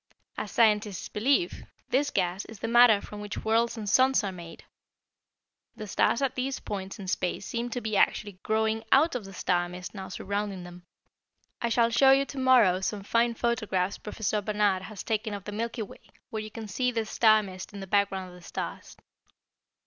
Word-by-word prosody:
As - - -4
scientists 210 -4 +2
believe, 280 - +1 0.3
this 285 +3 +2
gas 185 -4 -1
is 225 - -11
the 225 - -4
matter 235 -3 +6
from 210 0 -9
which 210 +1 -6
worlds 230 +2 +2
and 215 -2 -5
suns 260 +4 +4
are 195 - -2
made. 170 -2 -10 1.1
The 215 -2 -7
stars 230 +5 +1
at 265 -1 +1
these 260 +1 -2
points 195 -2 -5
in 195 - -8
space 185 +1 -2
seem 235 +1 -3
to 245 +1 -4
be 215 -1 -2
actually 200 -1 +1
growing 220 0 0
out 310 +5 +5
of 245 -5 -4
the 195 - -10
star 175 -1 0
mist 180 0 -8
now 190 -2 -7
surrounding 200 -1 -3
them. 175 0 -12 0.7
I 235 - 0
shall 230 0 +3
show 265 +4 +5
you 270 +1 +5
to 275 - -7
morrow 240 -8 +5
some 200 +1 -2
fine 230 +3 +1
photographs 210 -6 -1
Professor 210 0 -2
Barnard 205 -2 +1
has 195 0 -8
taken 215 -1 -2
of 200 - -8
the 210 - -6
Milky 230 +2 -3
Way 200 - -12 0.3
where 220 - -3
you 215 - -7
can 220 0 -8
see 250 +6 0
this 225 -2 -3
star 215 -2 +5
mist 185 -2 -8
in 200 - -8
the 195 - -6
background 195 -1 0
of - - -13
the 180 - -13
stars. - - -6
215 Hz, 195 wpm, -28 LUFS, 195-235 Hz, 1.1 s, matter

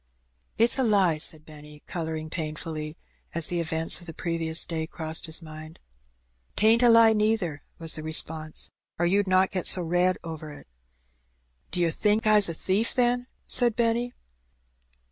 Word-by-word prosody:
" - - -44
It's 235 +3 +4
a - - +2
lie," 195 -8 +2
said 155 0 0
Benny, 150 -1 -14
colouring 160 -2 -5
painfully, 155 -1 -5 0.4
as 170 -2 0
the 175 +1 -3
event 160 0 +1
of 175 - -14
the 165 - -9
previous 165 -1 +1
day 160 -1 -4
crossed 160 0 -2
his 160 +1 +2
mind. 155 0 -11 0.8
"'T 215 - +1
ain't 225 +2 +5
a 245 - +5
lie, 230 -1 +6
neither," 210 -8 -1 0.2
was 165 -1 -4
the 155 - -6
response, 155 0 0 0.3
"or 175 - 0
you'd 195 +3 +1
not 185 0 +2
get 185 -2 -1
so 180 - +5
red 180 +2 +1
over 160 -2 -8
it." 145 - -12 1.0
"D'yer 175 -2 0
think 210 +5 0
I's 210 -3 +5
a 165 - -5
thief, 195 +7 -1
then?" 245 0 +1 0.2
said 240 -3 +2
Benny. 235 +1 0
170 Hz, 165 wpm, -26 LUFS, 160-210 Hz, 1.0 s, lie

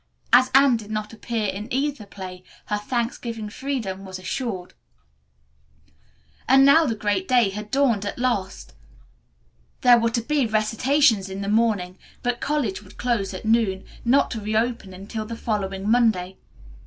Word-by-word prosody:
As 255 +1 +7
Anne 270 -3 +6
did 215 -2 -10
not 215 0 -4
appear 225 0 -3
in 200 +2 -4
either 270 -4 -2
play, 185 -2 -9 0.2
her 210 - -1
Thanksgiving 230 -1 -3
freedom 225 -8 -4
was 190 -1 -7
assured. 185 -1 -4 1.8
And 270 +1 +7
now 310 +3 +6
the 230 - -1
great 205 -3 -1
day 240 -6 +3
had 210 +1 -7
dawned 250 -6 +2
at 205 - -4
last! 195 - -2 1.1
There 245 -1 +7
were 230 0 +1
to 235 +1 -1
be 280 +1 0
recitations 220 0 +2
in 190 +1 -5
the 200 - -4
morning, 205 -4 +1 0.2
but 245 -1 -1
college 275 -10 -1
would 190 - -17
close 235 -6 -1
at 185 +2 -8
noon, 220 -4 +2 0.2
not 260 +4 +3
to 225 - -4
reopen 215 -1 -1
until 215 +3 -6
the 230 0 -6
following 195 -3 -3
Monday. 215 -6 +2
220 Hz, 155 wpm, -23 LUFS, 195-245 Hz, 1.8 s, As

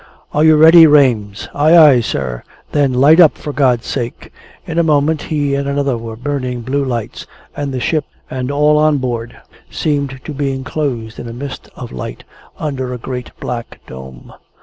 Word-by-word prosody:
"Are 150 - +2
you 160 0 +6
ready, 160 +2 +8
Rames?" 120 -9 +2
"Ay, 155 +4 +4
ay, 145 -7 +7
sir!" 65 - -3 0.3
"Then 145 -3 +2
light 140 +6 +5
up, 165 -4 +6
for 150 - -6
God's 125 -4 +1
sake!" 120 -3 -5 0.3
In 165 +1 -2
a - - +3
moment 155 0 +1
he 145 -3 -2
and 140 0 -1
another 140 -2 0
were 115 -1 -7
burning 125 -1 -4
blue 135 +4 -1
lights, 120 -5 -5 0.3
and 145 -1 -4
the 130 - -3
ship 150 +3 -1 0.2
and 130 0 -4
all 150 +1 +3
on 155 -1 +3
board 120 -3 -4 0.3
seemed 140 -3 -2
to 155 - -6
be 140 -1 -2
enclosed 130 -4 -4
in 120 - -7
a 115 - -7
mist 135 +2 -8
of - - -9
light, 65 -1 -7 0.3
under 130 -4 -4
a 125 - -4
great 125 +1 -6
black 120 -1 -6
dome. 65 -1 -11
135 Hz, 180 wpm, -16 LUFS, 120-150 Hz, 0.3 s, ready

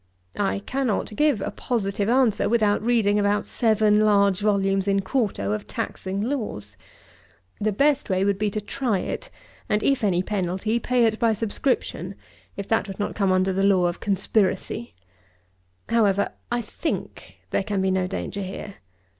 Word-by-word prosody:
I 200 -1 +1
cannot 260 -5 -1
give 295 -7 +2
a - - -2
positive 205 -4 -2
answer 245 -3 +3
without 215 -3 +2
reading 215 -3 +2
about 205 0 +1
seven 215 -2 +2
large 200 -3 +4
volumes 195 -2 +1
in 195 0 +2
quarto 195 - -1
of 105 0 -3
taxing 195 +1 -4
laws. 210 - -3 0.8
The 215 +1 +1
best 280 +6 +2
way 190 0 +1
would 200 -1 +1
be 210 0 +1
to 215 - -3
try 225 0 -1
it; - - -4 0.4
and, 210 0 +1
if 275 -4 +2
any 185 -3 +2
penalty, 195 +3 -1
pay 245 0 +2
it 220 -1 0
by 230 -1 +3
subscription, 205 -3 -2 0.4
if 200 - -5
that 225 -1 +1
would 195 -1 -7
not 205 - -2
come 195 -2 +1
under 185 +1 +2
the 195 - 0
law 195 -2 +4
of 175 0 -1
conspiracy! 195 - -1 0.9
However, 200 -4 +2 0.2
I 240 0 0
think, 315 +9 -5
there - - +1
can 205 -1 -2
be 190 0 +1
no 185 -1 +1
danger 200 +1 -4
here. 195 +1 -7
205 Hz, 165 wpm, -24 LUFS, 195-225 Hz, 0.9 s, large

